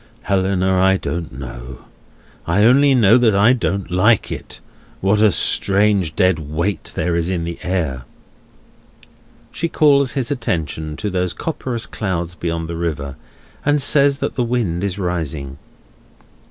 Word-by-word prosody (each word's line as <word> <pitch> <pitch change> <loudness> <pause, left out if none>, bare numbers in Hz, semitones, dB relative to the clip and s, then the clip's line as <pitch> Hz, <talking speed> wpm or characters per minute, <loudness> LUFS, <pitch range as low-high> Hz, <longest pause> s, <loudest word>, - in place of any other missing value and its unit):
"Helena, 95 -1 +1
I 95 0 +4
don't 85 -1 -4
know. 65 -1 -9 0.6
I 90 +5 +2
only 135 +4 +5
know 115 0 +5
that 115 -4 +3
I 105 +5 +5
don't 100 -7 -2
like 105 +5 +2
it. - - -7 0.4
What 100 +2 +2
a 110 -2 +5
strange 100 0 +2
dead 90 -3 +2
weight 80 +6 -3
there 85 -1 -1
is 85 +1 -1
in 90 -3 -2
the 85 0 -5
air!" 80 -9 -2 1.5
She 170 - -3
calls 140 -5 +3
his 135 0 -2
attention 80 - -3
to 105 -2 -3
those 90 -1 -1
copperous 130 -7 -4
clouds 85 -5 -3
beyond 85 -1 -3
the 85 - -5
river, 70 -5 -3 0.5
and 145 0 +2
says 140 0 +3
that - - -4
the 125 - -1
wind 115 -8 -1
is 100 -1 -2
rising. 80 -7 -4
95 Hz, 145 wpm, -19 LUFS, 85-115 Hz, 1.5 s, only